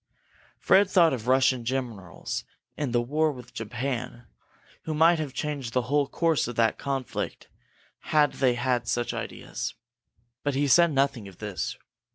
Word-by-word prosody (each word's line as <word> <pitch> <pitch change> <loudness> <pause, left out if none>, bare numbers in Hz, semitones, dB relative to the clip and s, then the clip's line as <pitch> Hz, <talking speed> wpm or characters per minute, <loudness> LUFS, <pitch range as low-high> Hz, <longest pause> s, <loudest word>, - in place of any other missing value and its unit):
Fred 200 0 +4
thought 170 -6 +5
of 120 -2 -5
Russian 130 -1 +3
generals 115 -8 -4 0.3
in 145 -3 -2
the 120 0 +2
war 155 +5 +1
with 125 -3 -11
Japan 120 +1 -4 0.6
who 155 - -2
might 165 +2 +5
have 150 -3 -3
changed 140 -4 -4
the 125 - +1
whole 140 +3 +1
course 165 +1 +1
of 120 - -5
that 115 -1 +2
conflict 135 -2 -4 0.6
had 150 -1 +3
they 125 -3 +2
had 120 -1 0
such 120 0 -1
ideas. - - -5 0.7
But 145 -2 -1
he 145 +1 +2
said 170 +4 +6
nothing 135 -6 0
of 95 -2 -13
this. 100 -6 -4
130 Hz, 155 wpm, -27 LUFS, 120-145 Hz, 0.7 s, said